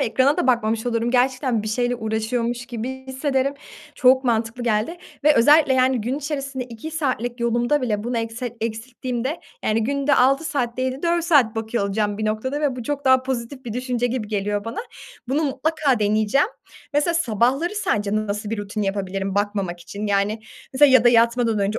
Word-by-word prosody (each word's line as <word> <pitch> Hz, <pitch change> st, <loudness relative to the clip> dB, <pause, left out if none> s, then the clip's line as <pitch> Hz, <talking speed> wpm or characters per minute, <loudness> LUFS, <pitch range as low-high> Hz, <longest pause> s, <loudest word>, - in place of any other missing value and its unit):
Ekrana 265 Hz, +3 st, +2 dB
da -, -, 0 dB
bakmamış 225 Hz, -2 st, +1 dB
olurum. 230 Hz, 0 st, 0 dB
Gerçekten 250 Hz, -2 st, +1 dB
bir 215 Hz, -, -4 dB
şeyle 245 Hz, +2 st, 0 dB
uğraşıyormuş 230 Hz, +2 st, -2 dB
gibi 255 Hz, +2 st, -6 dB
hissederim. 270 Hz, +1 st, -1 dB, 0.4 s
Çok 260 Hz, +1 st, +4 dB
mantıklı 230 Hz, 0 st, 0 dB
geldi. 230 Hz, +8 st, 0 dB, 0.3 s
Ve 300 Hz, 0 st, +6 dB
özellikle 290 Hz, +3 st, +5 dB
yani 255 Hz, -1 st, +3 dB
gün 250 Hz, +6 st, -2 dB
içerisinde 275 Hz, -3 st, -4 dB
2 240 Hz, +5 st, -8 dB
saatlik 255 Hz, -6 st, -2 dB
yolumda 240 Hz, +4 st, +1 dB
bile 210 Hz, -4 st, -1 dB
bunu 240 Hz, 0 st, -1 dB
ekset 230 Hz, +1 st, -4 dB
eksilttiğimde 240 Hz, +5 st, -4 dB, 0.2 s
yani 215 Hz, +1 st, +1 dB
günde 280 Hz, +3 st, +1 dB
6 275 Hz, +5 st, +3 dB
saat 250 Hz, -6 st, -2 dB
değil 255 Hz, 0 st, 0 dB
de 265 Hz, -, -9 dB
4 340 Hz, -1 st, +1 dB
saat 285 Hz, -10 st, +4 dB
bakıyor 225 Hz, -1 st, -1 dB
olacağım 205 Hz, 0 st, -1 dB
bir 215 Hz, -, -2 dB
noktada. 220 Hz, +7 st, -2 dB
Ve 285 Hz, -4 st, 0 dB
bu 245 Hz, -, -5 dB
çok 285 Hz, +4 st, -3 dB
daha 260 Hz, -1 st, +5 dB
pozitif 260 Hz, +1 st, -4 dB
bir 230 Hz, -, -5 dB
düşünce 250 Hz, 0 st, -1 dB
gibi 240 Hz, -3 st, -3 dB
geliyor 205 Hz, -1 st, -2 dB
bana. 230 Hz, +1 st, -5 dB, 0.5 s
Bunu 290 Hz, +5 st, +1 dB
mutlaka 285 Hz, -1 st, 0 dB
deneyeceğim. 215 Hz, -, +2 dB, 0.5 s
Mesela 295 Hz, +4 st, +1 dB
sabahları 270 Hz, -, +1 dB
sence 210 Hz, -, -1 dB
nasıl 210 Hz, 0 st, -3 dB
bir 225 Hz, -, -2 dB
rutin 205 Hz, +1 st, -3 dB
yapabilirim 195 Hz, -1 st, -2 dB
bakmamak 200 Hz, -4 st, -1 dB
için? 200 Hz, +4 st, -6 dB
Yani, 205 Hz, +2 st, 0 dB, 0.3 s
mesela 280 Hz, +2 st, +6 dB
ya 260 Hz, -3 st, +6 dB
da -, -, +8 dB
yatmadan 235 Hz, -1 st, +3 dB
önce 205 Hz, +2 st, 0 dB
240 Hz, 180 wpm, -22 LUFS, 220-265 Hz, 0.5 s, da